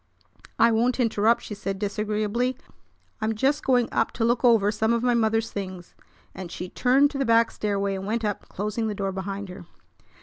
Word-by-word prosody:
"I 230 - +5
won't 240 +3 +1
interrupt," 230 -1 +2
she - - -7
said 195 -1 -4
disagreeably. 215 +4 -1 0.6
"I'm 220 0 0
just 275 +7 +1
going 245 -3 +3
up 225 - +1
to 230 - 0
look 235 +2 +1
over 225 -4 +4
some 220 +2 +1
of 235 0 0
my 245 -1 +3
mother's 225 -1 +1
things." 185 -3 -7 0.4
And 185 -2 -8
she 180 - -6
turned 270 +7 +3
to 275 - -5
the - - +2
back 230 0 +4
stairway, 200 -1 -1
and 195 0 -5
went 225 +1 -1
up, 205 -1 -4
closing 210 +3 -3
the 210 - -3
door 195 -1 -2
behind 195 +1 -5
her. 180 -2 -10
220 Hz, 195 wpm, -25 LUFS, 200-235 Hz, 0.6 s, I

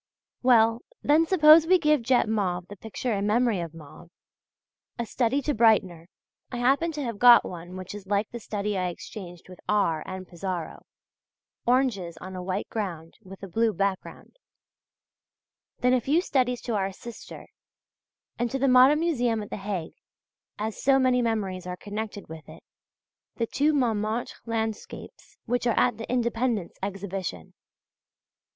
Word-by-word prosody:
Well, 230 -2 +4 0.2
then, 315 +3 +4
suppose 320 -2 +7
we 370 +1 +6
give 300 -4 +2
Jet 245 0 +2
Mauve 185 -5 -1
the 205 - -8
picture 225 +4 -4
in 200 0 -1
memory 230 -2 +2
of 165 -1 -6
Mauve, 165 +2 -13 0.9
a 235 - -2
study 250 +5 0
to 295 - 0
Breitner 195 -8 +2 0.4
(I 245 - -4
happen 275 +7 +2
to 295 -1 -4
have 230 -5 -4
got 245 -1 +8
one 175 +1 -8
which 185 +1 -7
is 205 -2 -9
like 205 +1 +1
the 235 - -6
study 210 -1 -3
I 185 -1 0
exchanged 175 0 -9
with 185 -1 -13
R. 170 -7 +2
and 185 0 -7
Pissaro: 180 -1 -5 0.8
oranges 230 -10 +1
on 185 +3 -9
a 180 - -5
white 185 +2 -3
ground, 170 -7 -5
with 195 0 -12
a - - -5
blue 225 +4 +1
background) 195 - -4 1.4
then 250 0 +3
a 255 - +3
few 290 +8 +2
studies 255 -8 0
to 235 - -3
our 195 -2 0
sister, 235 +4 -11 0.9
and 240 0 0
to 270 - -2
the 275 +1 +1
Modern 260 +4 +6
Museum 245 -10 0
at 205 - -12
the - - -4
Hague 195 -5 -4 0.6
(as 215 +1 -4
so 270 0 +4
many 255 -1 +3
memories 195 -6 -2
are 180 0 -5
connected 205 +1 -6
with 160 -1 -11
it) 155 - -13 0.7
the 230 - -1
two 290 +6 +1
Montmartre 230 -4 -1
landscapes 225 - -5
which 245 +1 0
are 235 - +1
at 235 -3 +2
the 225 - -6
Independants' 235 -5 -1
exhibition. 190 - -5
220 Hz, 160 wpm, -26 LUFS, 190-250 Hz, 1.4 s, got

